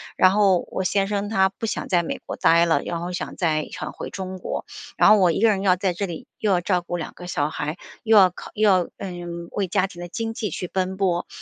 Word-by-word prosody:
然 185 - +5
后 195 -3 +3
我 190 - -2
先 195 +1 +1
生 205 0 -2
他 190 -3 +3
不 210 - -6
想 - - -3
在 175 -2 +3
美 165 - -4
国 - - -5
呆 170 +1 +4
了， 160 -4 +2
然 170 - -3
后 175 +1 -4
想 180 - -4
再 155 -3 0
想 - - -6
回 - - -7
中 185 -1 -6
国。 - - -4 0.3
然 - - +6
后 215 - +7
我 185 -4 +4
1 - - -1
个 225 - +6
人 200 -3 +1
要 190 -2 +4
在 185 0 -1
这 195 +3 -3
里 170 -3 -7
又 210 - +1
要 180 - +3
照 180 0 +1
顾 175 0 -4
2 165 - -6
个 175 - -10
小 150 -4 0
孩， 150 +2 -4 0.3
又 220 -1 +5
要 190 -2 +8
考 - - -10
又 215 0 +3
要， 185 -3 +3
嗯， 175 -2 -6
为 200 -2 -1
家 185 +1 +1
庭 175 -2 -11
的 175 - -5
经 225 +5 -4
济 215 -2 -3
去 180 +2 -4
奔 190 +1 -2
波。 180 -3 0
185 Hz, 275 characters per minute, -23 LUFS, 175-200 Hz, 0.3 s, 要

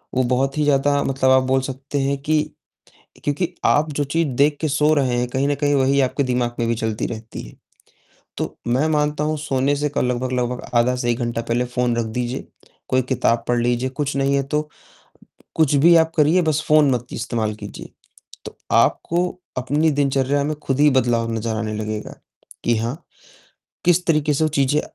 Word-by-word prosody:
वो 130 - +3
बहुत 135 +3 0
ही 150 - +2
ज़्यादा 145 0 +2
मतलब 135 -1 +1
आप 130 0 +5
बोल 130 +1 +1
सकते 135 +2 -4
हैं 140 +1 0
कि 155 +1 +2 0.8
क्योंकि 170 +5 -1
आप 150 +1 +3
जो 145 - 0
चीज़ 165 +3 0
देख 145 +2 +3
के 155 - +1
सो 150 +2 +3
रहे 130 -4 +1
हैं, 125 - -1
कहीं 135 +2 0
न 145 - +1
कहीं 145 0 0
वही 135 +1 +2
आपके 135 +2 0
दिमाग 125 -1 -1
में 115 - 0
भी 115 - +1
चलती 110 -1 -2
रहती 110 0 -7
है। - - -12 0.8
तो - - -4
मैं 125 +6 +1
मानता 150 -1 0
हूँ 155 +1 -1
सोने 140 -1 0
से 150 +1 -1
क - - +2
लगभग-लगभग 125 0 -1
आधा 120 +1 +3
से 120 -1 -1
1 120 - -1
घंटा 120 -1 -2
पहले 120 +2 0
फ़ोन 125 -1 -1
रख 115 -1 -1
दीजिए। 125 +1 -3 0.4
कोई 130 0 +2
किताब 120 -2 0
पढ़ 120 - +2
लीजिए। 120 +1 0
कुछ 140 +1 -3
नहीं 140 0 +1
है 140 - +1
तो 150 +1 -2 0.9
कुछ 155 -3 +2
भी 170 +5 +6
आप 160 0 +3
करिए, 160 +4 +4
बस 155 -2 0
फ़ोन 150 -2 +5
मत 120 -1 -1
इस्तेमाल 115 -2 -2
कीजिए। 105 -1 -10 0.5
तो - - -9 0.2
आपको 175 +2 +2 0.3
अपनी 145 +5 +1
दिनचर्या 140 0 +1
में 150 +1 -2
खुद 135 +1 -1
ही 150 - +6
बदलाव 120 -3 +1
नज़र 110 0 -2
आने 110 -1 -3
लगेगा 110 0 -5 0.5
कि 120 - +2
हाँ, 120 +9 -4 0.8
किस 175 +1 +3
तरीके 150 -2 +2
से 160 - +1
वो 155 - +2
चीज़ें 140 +2 +2
135 Hz, 195 wpm, -21 LUFS, 120-150 Hz, 0.9 s, भी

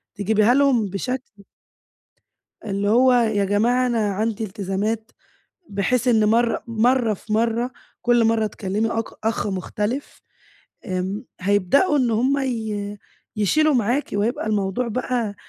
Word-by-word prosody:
تجيبيها 215 +3 +3
لَهُم 270 -5 +3
بشكل 210 +1 -5 1.2
اللي 200 -1 -1
هو 250 +4 +5
يا 220 -4 +2
جماعة 235 +6 +2
أنا 225 -4 0
عندي 220 +2 -1
التزامات، 210 +2 -3 0.6
بحيث 240 +5 0
إن 220 -3 +4
مَرّة 230 +2 +2
مَرّة 230 0 +2
في 215 +2 -6
مَرّة 230 +3 0 0.3
كلّ 240 -1 +3
مَرّة 225 -1 +2
تكلّمي 210 +2 -2
أك 225 -1 -1 0.2
أخ 220 -1 0
مختلِف. 210 +7 -4 0.6
آمم، 190 +4 -3 0.2
هيبدؤوا 205 - +3
إن 250 -4 +1
هُم 255 +6 +2
ي 220 -6 -3 0.4
يشيلوا 295 - +2
معاكِ 245 +4 0
وهيبقى 215 +3 -1
الموضوع 210 +3 -1
بقى 235 -2 -2
220 Hz, 125 wpm, -22 LUFS, 205-245 Hz, 1.2 s, هو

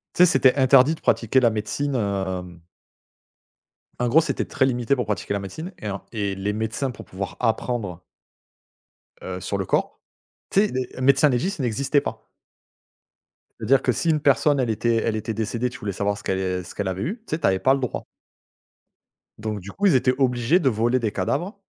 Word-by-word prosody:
Tu - - -12
sais, - - +10
c'était 135 -6 +4
interdit 135 +2 +5
de - - -18
pratiquer 120 +3 +2
la 120 - +4
médecine, 120 +6 -2
hem 95 -5 -3 1.4
en 120 - +1
gros, 160 +7 +6
c'était 165 - -2
très 130 - +1
limité 125 +1 +1
pour 125 - -2
pratiquer 100 -1 -2
la 100 - -1
médecine 155 - -7
et 105 - -5
en 100 -1 -4
et 100 -3 -2
les 100 +2 -2
médecins 110 +5 -2
pour 115 - -11
pouvoir 95 +1 -6
apprendre 110 -6 -1 1.2
heu, 90 -1 -5
sur 100 - -2
le 95 - -2
corps - - -1 0.5
tu 200 +2 +4
sais - - -9
les 130 0 -4
médecins 140 +2 +5
légistes 160 +9 -1
n'existaient 135 +4 +1
pas. - - -6 1.3
C'est-à-dire 130 +4 +3
que 125 - +2
si 165 +7 -1
une 155 - +3
personne 140 0 +3
elle 125 - 0
était 115 +1 +1
elle 115 -1 0
était 110 +1 -3
décédée, 115 +3 -2
tu 125 - -11
voulais 100 - -3
savoir 100 +1 -1
ce - - -12
qu'elle 95 -1 -2
ce - - -11
qu'elle 100 -2 -2
avait 95 +1 -2
eu, 195 - -2
tu - - -1
sais? - - -6
Tu - - +2
avais 95 -1 +2
pas 130 +7 +4
le 135 - 0
droit. 125 - -3 1.3
Donc 110 -1 -4
du 95 +2 -9
coup 205 - -2
ils 170 - +4
étaient 130 0 +3
obligés 130 +5 +2
de 135 - +2
voler 120 +2 +1
des 110 -3 -1
cadavres 145 - -2
120 Hz, 200 wpm, -23 LUFS, 100-135 Hz, 1.4 s, sais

